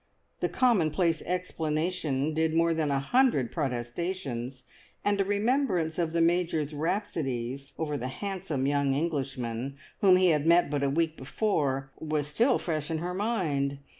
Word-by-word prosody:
The - - 0
commonplace 170 - +2
explanation 160 -4 -1
did 160 0 +1
more 165 0 +3
than 160 -2 0
a 140 -1 +1
hundred 185 - +2
protestations, 130 -1 -3 0.4
and 205 -1 +2
a - - +4
remembrance 200 - +1
of 165 -2 0
the 165 0 +1
Major's 165 -3 +1
rhapsodies 140 - -2
over 150 -2 -2
the 125 - -4
handsome 175 -2 -3
young 140 -1 +2
Englishman 135 -4 -2 0.2
whom 190 -2 +6
he 185 0 +4
had 150 -1 +2
met 170 -2 +5
but 145 -1 0
a 140 - +2
week 160 +2 0
before 135 -4 -1
was 155 -2 -1
still 225 - +2
fresh 155 -4 -3
in 160 - -1
her 175 +3 -3
mind. 165 -10 0
160 Hz, 150 wpm, -28 LUFS, 140-180 Hz, 0.4 s, whom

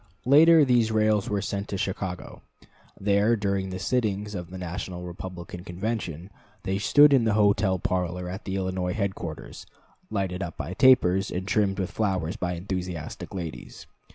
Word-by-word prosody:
Later, 155 +3 +7
these 120 -3 +3
rails 110 -2 +2
were 100 -2 -1
sent 100 0 -3
to 100 - -4
Chicago; 95 -3 -4 0.6
there, 100 +3 +3
during 100 -2 -1
the 95 - -5
sittings 105 0 -1
of 90 -3 -6
the 95 - -8
National 90 0 -5
Republican 90 0 -8
Convention, 90 -2 -4 0.3
they 95 0 -1
stood 145 +7 +6
in 130 -4 +5
the 110 -2 +2
hotel 100 -2 +3
parlor 90 0 -2
at 95 +2 -7
the 95 - -3
Illinois 95 -1 -2
headquarters, 95 -7 -5 0.4
lighted 95 -3 -2
up 85 -4 -5
by 80 +6 -5
tapers, 95 -5 +4
and 95 +2 -4
trimmed 100 -2 +1
with 95 -2 -2
flowers 95 -6 -1
by 90 -1 -2
enthusiastic 90 -3 -5
ladies. 85 -5 -7
95 Hz, 155 wpm, -26 LUFS, 90-105 Hz, 0.6 s, Later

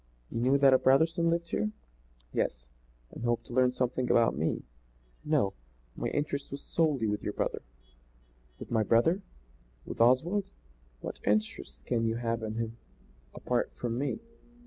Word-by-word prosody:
You - - -2
knew 130 +4 +4
that 135 -1 +6
a 130 - +6
Brotherson 165 +6 +3
lived 170 0 0
here?" 105 - 0 0.6
"Yes." - - -1 0.5
"And - - -8
hoped 120 -1 0
to - - -10
learn 125 0 +4
something 125 0 -1
about 115 - +4
me?" 80 +3 -1 0.6
"No; 150 -10 +2 0.4
my - - -2
interest 145 -1 -2
was 140 +1 -7
solely 150 -8 +1
with 105 -1 -1
your 105 - -3
brother." - - -2 1.0
"With - - -9
my 115 -2 +3
brother? 120 - +3 0.6
With - - -4
Oswald? 170 - +3 0.5
What - - -6
interest 105 -10 -1
can 115 -2 0
you 115 - 0
have 115 -1 -1
in 110 0 -4
him 115 0 -3 0.6
apart 125 -1 -1
from 120 0 -2
me? 140 +1 -1
125 Hz, 155 wpm, -30 LUFS, 115-140 Hz, 1.0 s, that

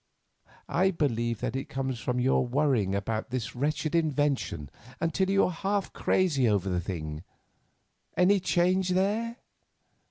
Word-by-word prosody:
I 185 +3 +2
believe 120 - -1
that - - -2
it 135 - -4
comes 130 -2 -3
from 125 +1 -1
your 130 +2 +3
worrying 125 -7 +1
about 110 +2 -2
this 125 -1 -4
wretched 150 +4 -1
invention 145 - 0 0.3
until 180 +3 0
you 195 0 +4
are - - -1
half 195 +3 -2
crazy 145 -10 +2
over 100 -2 +1
the 90 -1 0
thing. 80 -4 -5 1.0
Any 195 +2 +5
change 185 +1 +2
there?" 215 +5 0
140 Hz, 135 wpm, -28 LUFS, 115-180 Hz, 1.0 s, Any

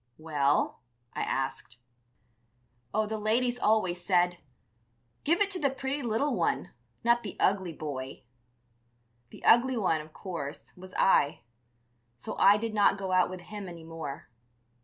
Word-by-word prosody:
"Well?" 145 -3 +1 0.3
I - - -3
asked. 120 - -3 1.1
"Oh, 215 +1 +1
the 220 +1 -4
ladies 240 +3 +1
always 185 -6 +1
said, 175 -2 +2 0.8
'Give 340 +6 +2
it 400 -1 +2
to 365 - +1
the 285 -4 +2
pretty 270 +2 -3
little 240 +4 0
one, - - 0 0.3
not 235 +1 +4
the 205 - -7
ugly 190 -3 +1
boy.' 135 -4 -6 1.1
The - - -12
ugly 245 +2 +5
one, 170 -7 +1
of 155 +1 -13
course, 155 -5 -7
was 185 0 -12
I; 145 -6 +3 0.8
so 120 - -6
I 200 +1 +7
did 225 +1 -3
not 205 -2 +4
go 190 -1 -4
out 185 0 +4
with 185 -1 -7
him 205 +1 -8
any 170 -2 -10
more. 160 -4 -7
195 Hz, 145 wpm, -29 LUFS, 165-230 Hz, 1.1 s, I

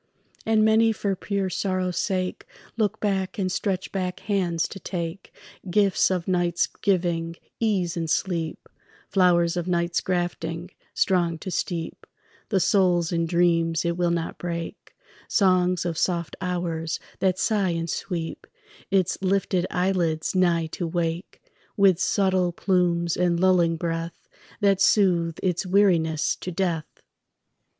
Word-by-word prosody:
And 220 -1 +4
many 225 +1 +4
for 200 -2 -1
pure 195 0 -2
sorrow's 185 -1 -1
sake 185 -1 -2 0.3
Look 215 -3 0
back 195 -1 -1
and 185 -2 -1
stretch 190 -1 -2
back 185 -2 -3
hands 175 -5 0
to 195 - -8
take 170 0 -5 0.4
Gifts 195 0 +3
of 180 -3 -2
night's 175 -2 +1
giving, 170 -4 -1 0.2
ease 195 -7 0
and 165 -2 -3
sleep, 170 -2 -2 0.4
Flowers 175 -2 +3
of 175 0 -2
night's 170 -1 0
grafting, 175 -1 -3 0.2
strong 175 -3 +2
to 185 +3 -6
steep 170 -1 -4 0.4
The 195 - +2
soul 180 -2 +3
in 165 -1 0
dreams 165 -1 +2
it 170 0 0
will 175 0 +1
not 170 -1 -2
break, 170 +2 -6 0.3
Songs 185 -3 +2
of 170 -2 -2
soft 170 -3 -1
hours 170 -3 -2 0.2
that 185 -1 +1
sigh 200 -2 +1
and 165 -1 -2
sweep 170 -1 -4 0.4
Its 190 -2 +1
lifted 190 -1 +1
eyelids 180 -4 0
nigh 175 -3 +2
to 175 - -3
wake 170 +1 -3 0.3
With 195 -4 +5
subtle 185 -3 +2
plumes 170 -2 +1
and 175 -1 +1
lulling 175 -3 +3
breath 165 0 -4 0.3
That 195 -1 +3
soothe 175 -6 +3
its 180 -2 0
weariness 180 -4 +2
to 180 - -6
death. 170 -3 -3
180 Hz, 135 wpm, -25 LUFS, 170-190 Hz, 0.4 s, With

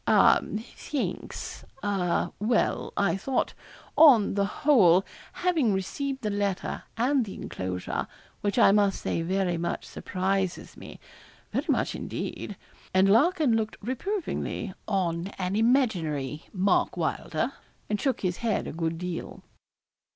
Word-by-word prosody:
'A - - +6 0.3
thanks 290 -3 -4 0.2
a 180 -4 0
well 220 +3 +1
I 200 0 +2
thought, 255 +6 -1 0.4
on 255 -10 +7
the 200 0 +1 0.2
whole, 195 - +6 0.3
having 325 - +2
received 265 +8 -3
the 210 - 0
letter 200 -2 -2 0.2
and 255 +3 +2
the 200 - -7
enclosure, 90 -1 -4 0.3
which 205 -1 -1
I - - +7
must 200 -1 +3
say - - -1
very 180 0 0
much 170 +1 -3
surprises 190 0 -2
me - - -11 0.5
very - - -1
much - - +1
indeed.' - - -5 0.4
And 190 +1 +5
Larkin 290 - +4
looked 220 -1 -1
reprovingly 260 - -3
on 180 -4 0
an 185 +1 -1
imaginary 180 - +1
Mark 195 0 +1
Wylder, - - -1 0.3
and 210 - -1
shook 270 -2 0
his 180 -2 -1
head 230 -3 0
a - - -5
good 165 0 -2
deal. 180 0 -5
200 Hz, 130 wpm, -27 LUFS, 180-240 Hz, 0.5 s, on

